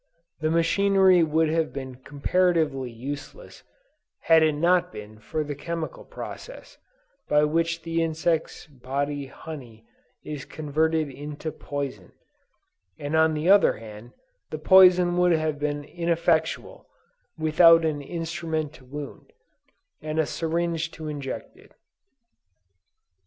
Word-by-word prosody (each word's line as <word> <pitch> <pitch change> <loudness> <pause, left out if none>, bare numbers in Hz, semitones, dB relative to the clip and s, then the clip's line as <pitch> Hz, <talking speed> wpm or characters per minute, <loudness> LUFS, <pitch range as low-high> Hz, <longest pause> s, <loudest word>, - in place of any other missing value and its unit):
The 155 0 0
machinery 185 +2 +4
would 160 0 +2
have 160 0 0
been 130 -2 -6
comparatively 145 -1 0
useless 145 - -8 0.6
had 165 -1 +5
it 155 -1 +3
not 175 +3 +2
been 105 -3 -10
for 155 +8 -3
the 145 0 -5
chemical 160 +3 -5
process, - - -10 0.5
by 150 0 +4
which 165 +2 +1
in 165 - -28
the 165 0 -1
insect's 160 0 -1
body 140 +1 -4
honey 125 -7 -10 0.4
is 150 -3 -6
converted 155 0 -1
into 150 +3 -6
poison; 140 -13 -6 0.8
and 145 +2 -3
on 160 0 +3
the 155 +3 -2
other 200 +1 +6
hand, 110 +2 -11 0.4
the - - -4
poison 180 -2 +6
would 180 -1 +4
have 155 -2 -1
been 145 0 -2
ineffectual, 170 - -1 0.5
without 165 +1 +6
an 150 -2 -1
instrument 160 -1 -4
to 130 - -16
wound, 145 +2 -9 0.7
and 155 0 -4
a 160 - +3
syringe 165 +1 -2
to 155 -1 -7
inject 140 -3 -6
it." - - -21
155 Hz, 125 wpm, -25 LUFS, 145-165 Hz, 0.8 s, other